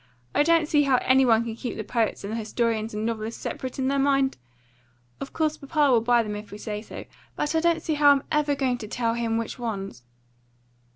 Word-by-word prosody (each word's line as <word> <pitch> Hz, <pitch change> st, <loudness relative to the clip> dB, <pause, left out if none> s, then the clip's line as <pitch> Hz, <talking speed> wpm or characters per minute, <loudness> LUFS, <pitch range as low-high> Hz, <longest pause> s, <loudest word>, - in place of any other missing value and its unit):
I -, -, +3 dB
don't 330 Hz, 0 st, +3 dB
see 295 Hz, -1 st, +3 dB
how 270 Hz, -3 st, +3 dB
any 260 Hz, 0 st, +4 dB
one 225 Hz, -1 st, +4 dB
can 230 Hz, -1 st, -5 dB
keep 240 Hz, +1 st, -5 dB
the 215 Hz, -, -3 dB
poets 225 Hz, -2 st, -1 dB
and 200 Hz, +2 st, -5 dB
the -, -, -2 dB
historians 225 Hz, 0 st, -1 dB
and 215 Hz, +1 st, -2 dB
novelists 225 Hz, 0 st, -3 dB
separate 260 Hz, -1 st, -5 dB
in 260 Hz, -1 st, 0 dB
their 275 Hz, +1 st, +1 dB
mind. 275 Hz, -1 st, +2 dB, 0.8 s
Of 275 Hz, -, -6 dB
course 310 Hz, -1 st, -1 dB
papa 290 Hz, -1 st, +1 dB
will 235 Hz, -2 st, +4 dB
buy 240 Hz, 0 st, +3 dB
them 210 Hz, -1 st, -5 dB
if 210 Hz, 0 st, -8 dB
we 205 Hz, -, -9 dB
say 210 Hz, -1 st, -5 dB
so. 220 Hz, -, -9 dB, 0.3 s
But 295 Hz, -, -1 dB
I 320 Hz, -, +3 dB
don't 335 Hz, 0 st, +1 dB
see 315 Hz, -, -1 dB
how 290 Hz, -1 st, +5 dB
I'm 280 Hz, -1 st, +4 dB
ever 300 Hz, -2 st, +2 dB
going 255 Hz, -3 st, -1 dB
to 215 Hz, -, -7 dB
tell 230 Hz, +1 st, -1 dB
him 230 Hz, -1 st, -1 dB
which 230 Hz, +2 st, -4 dB
ones." 195 Hz, -, -5 dB
245 Hz, 230 wpm, -25 LUFS, 225-285 Hz, 0.8 s, how